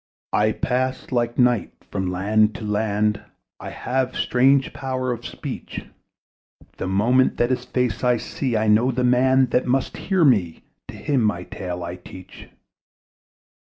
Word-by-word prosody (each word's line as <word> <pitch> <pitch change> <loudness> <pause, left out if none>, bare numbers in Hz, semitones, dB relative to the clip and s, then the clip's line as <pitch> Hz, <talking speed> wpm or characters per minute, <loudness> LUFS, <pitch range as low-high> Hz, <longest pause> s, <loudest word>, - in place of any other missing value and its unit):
I 110 +1 +3
pass, 130 +2 -2
like 120 -1 0
night, 125 -6 +2 0.2
from 95 -2 -2
land 105 +4 +2
to - - -7
land; 105 0 0 0.4
I - - -7
have 130 0 -2
strange 135 +2 +2
power 130 -2 -3
of 120 - -5
speech; - - -7 0.9
That - - -3
moment 115 +7 +2
that 120 +1 +1
his 130 - -1
face 125 -1 -1
I 125 -1 +3
see, 120 +1 -2
I 110 0 0
know 110 +4 +4
the 125 0 -1
man 130 +1 +3
that 125 - +1
must 130 +1 0
hear 190 -4 +1
me: 100 - +2 0.2
To - - -9
him 140 -4 0
my 100 -4 0
tale 90 -2 -6
I 85 +1 -6
teach. 90 +1 -13
120 Hz, 155 wpm, -22 LUFS, 105-130 Hz, 0.9 s, know